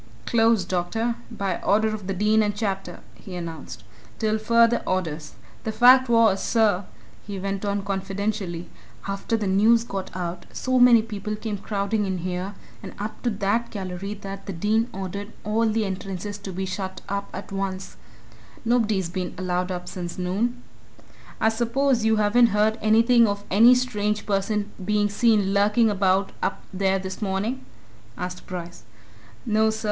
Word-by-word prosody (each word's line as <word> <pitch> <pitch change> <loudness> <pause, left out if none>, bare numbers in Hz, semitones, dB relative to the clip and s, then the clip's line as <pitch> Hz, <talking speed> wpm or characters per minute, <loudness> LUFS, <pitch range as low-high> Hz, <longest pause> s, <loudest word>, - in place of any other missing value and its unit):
"Closed, 225 -5 +3
doctor 205 +7 -1 0.2
by 200 -6 -3
order 220 +2 +3
of 215 -3 -5
the 195 - -1
Dean 210 +3 +3
and 210 -1 0
Chapter," 195 -3 -3
he 185 - -10
announced. 165 -9 -7 0.3
"Till 220 0 0
further 230 +2 +4
orders. 160 -5 -2 0.3
The 220 - -2
fact 250 +3 +6
was, 225 -4 +4
sir," 210 -5 +2 0.4
he 200 -1 -5
went 195 +1 -3
on 200 -1 -1
confidentially, 195 -2 -3 0.4
"after 195 +3 -1
the 215 - -2
news 215 +4 +4
got 195 -4 -5
out, 175 -1 -4
so 255 0 0
many 240 -2 +7
people 210 -1 -4
came 210 -1 -4
crowding 205 +1 -1
in 190 -1 -1
here 180 +3 -4 0.3
and - - -9
up 210 +2 -6
to 245 - 0
that 210 +2 0
gallery 195 0 -5
that 195 -1 -8
the 195 - -3
Dean 215 +6 +1
ordered 200 +2 -6
all 220 +1 +1
the 220 0 0
entrances 195 +1 -5
to 200 -1 -7
be 190 +1 -3
shut 190 0 -5
up 200 0 -3
at 195 - -8
once 195 -1 -4 0.7
nobody's 220 -6 +2
been 180 +1 -4
allowed 180 0 -1
up 180 -1 -5
since 175 -2 -6
noon." 215 +7 -1 0.8
"I 220 - +4
suppose 240 +2 +1
you 220 0 +3
haven't 215 +3 +4
heard 220 +1 +2
anything 230 +2 +5
of 200 0 -2
any 230 +6 +7
strange 210 -4 -1
person 205 +1 -1
being 205 +1 +1
seen 205 -2 +2
lurking 210 +3 +3
about 195 0 +2
up - - -2
there 190 0 +1
this 190 +1 -6
morning?" 210 +6 -2 0.5
asked 180 0 -6
Bryce. 175 -2 -7 0.6
"No, 220 -1 +3
sir. 220 0 -3
205 Hz, 160 wpm, -24 LUFS, 190-220 Hz, 0.8 s, many